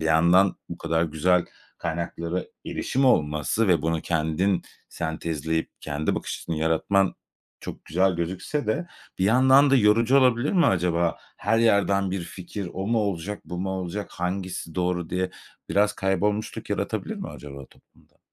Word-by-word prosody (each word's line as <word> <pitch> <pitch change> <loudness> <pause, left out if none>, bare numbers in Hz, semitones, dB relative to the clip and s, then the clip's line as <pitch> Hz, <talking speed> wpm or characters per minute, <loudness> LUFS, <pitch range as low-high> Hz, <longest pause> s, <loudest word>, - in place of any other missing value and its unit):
bir - - -3
yandan 85 +4 +4
bu - - -7
kadar 80 0 0
güzel 85 +3 +2 0.3
kaynaklara 85 +1 -3 0.2
erişim 135 +2 -1
olması 75 - +2
ve 90 -2 +3
bunu 80 0 0
kendin 85 +4 0 0.3
sentezleyip 80 -1 -2
kendi 75 +2 -1
bakış - - -4
açısını 85 - -5
yaratman 80 +5 +2 0.5
çok - - -8
güzel 95 +4 +2
gözükse 95 - -3
de 170 +11 -1 0.3
bir 95 - +1
yandan 130 +5 +6
da 135 - +6
yorucu 115 +3 +4
olabilir 125 +1 +3
mi 180 -4 +4
acaba? 85 -2 +1 0.2
Her 115 +3 +1
yerden 100 -4 +3
bir 95 -2 -2
fikir; 95 +2 -7
"O 95 +2 -4
mu 115 0 +2
olacak, 100 -1 -2
bu 90 - -6
mu 95 +1 -2
olacak, 95 +2 -4
hangisi 90 -2 -4
doğru?" 90 -2 -1
diye 90 +1 -1 0.4
biraz 105 +1 +3
kaybolmuşluk 100 +3 -1
yaratabilir - - -2
mi - - -6
acaba 70 -2 -9
toplumda? - - -27
90 Hz, 150 wpm, -25 LUFS, 85-105 Hz, 0.5 s, yandan